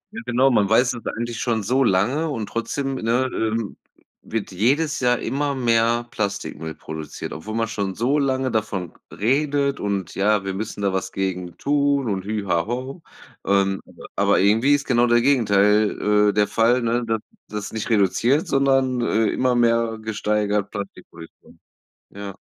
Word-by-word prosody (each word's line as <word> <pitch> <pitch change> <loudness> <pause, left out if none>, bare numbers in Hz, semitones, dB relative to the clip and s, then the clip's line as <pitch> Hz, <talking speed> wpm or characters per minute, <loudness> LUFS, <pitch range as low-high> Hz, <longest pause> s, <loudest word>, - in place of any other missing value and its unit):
Ja, - - -4
genau. 130 +2 +3
Man 105 -4 +2
weiß 125 +3 +4
es 120 - -7
eigentlich 120 0 -4
schon 115 -4 -1
so 130 +6 +2
lange 120 +11 +1
und 110 -7 -3
trotzdem, 135 +4 -3
ne, 125 +2 0
ähm, 110 -1 -2 0.5
wird 110 -3 -4
jedes 140 - +1
Jahr 125 -1 +2
immer 140 +3 -2
mehr 120 -1 +2
Plastikmüll 100 -6 -4
produziert, 80 -1 -7
obwohl 105 +8 -6
man 115 0 0
schon 100 -4 -3
so 135 +6 +1
lange 130 -2 0
davon 100 -6 -2 0.2
redet: 140 +4 0
„Und 100 -3 -3
ja, 100 0 +1
wir 95 - -2
müssen 105 +1 -5
da 95 -1 +1
was 95 0 -2
gegen 90 -3 -3
tun 140 -2 +1
und 95 -2 -2
hü 105 -1 -3
ha 85 +1 0
ho.” 130 +7 -5 0.4
Ähm, 95 0 +1
aber - - -15
aber - - +3
irgendwie 115 +9 +4
ist 140 - -3
genau 120 -1 +3
der 120 0 +4
Gegenteil, 105 -4 +3
äh, - - 0
der 105 -1 +2
Fall, 120 +2 +2
ne, 120 +1 0
dass 110 -1 0 0.3
dass 105 0 -6
nicht 110 +1 -4
reduziert, 115 - +2
sondern, 135 -2 +2
äh, 110 -1 +1
immer 125 -1 +1
mehr 115 -1 +2
gesteigert 105 -1 -1
Plastikproduktion. 95 -5 -10 0.5
Ja. 100 -1 -8
115 Hz, 165 wpm, -22 LUFS, 100-130 Hz, 0.5 s, weiß